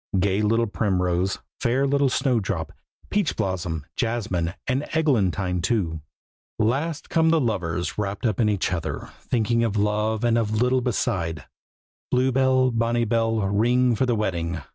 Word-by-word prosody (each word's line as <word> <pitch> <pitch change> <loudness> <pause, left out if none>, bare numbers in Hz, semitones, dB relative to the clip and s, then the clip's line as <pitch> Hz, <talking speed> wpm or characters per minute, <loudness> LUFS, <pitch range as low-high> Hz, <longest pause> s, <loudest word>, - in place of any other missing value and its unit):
Gay 100 +2 +1
little 115 +2 +2
Primrose, 95 -3 0 0.2
fair 130 +4 +1
little 140 0 +2
Snowdrop, 115 - -1 0.4
Peachblossom, 95 - -1
Jasmine 100 -7 -1
and 130 +2 0
Eglantine 100 - +1
too. 85 -8 -1 0.6
Last 140 +9 -1
come 160 -1 +2
the 165 0 +4
lovers, 90 - -2
wrapped 100 +2 -3
up 110 -4 0
in 110 -2 +3
each 100 -3 0
other, 85 -3 -4
Thinking 115 0 0
of 110 -2 0
love, 105 +2 0
and 115 -1 +3
of 110 -1 -1
little 125 +1 +2
beside; 95 -9 -1 0.6
Blue 130 +1 +2
bell, 130 0 +3
bonnie 115 0 +1
bell, 115 0 +1
ring 120 +5 +2
for 130 +4 +1
the 120 - +2
wedding! 85 -6 -2
110 Hz, 140 wpm, -24 LUFS, 95-125 Hz, 0.6 s, the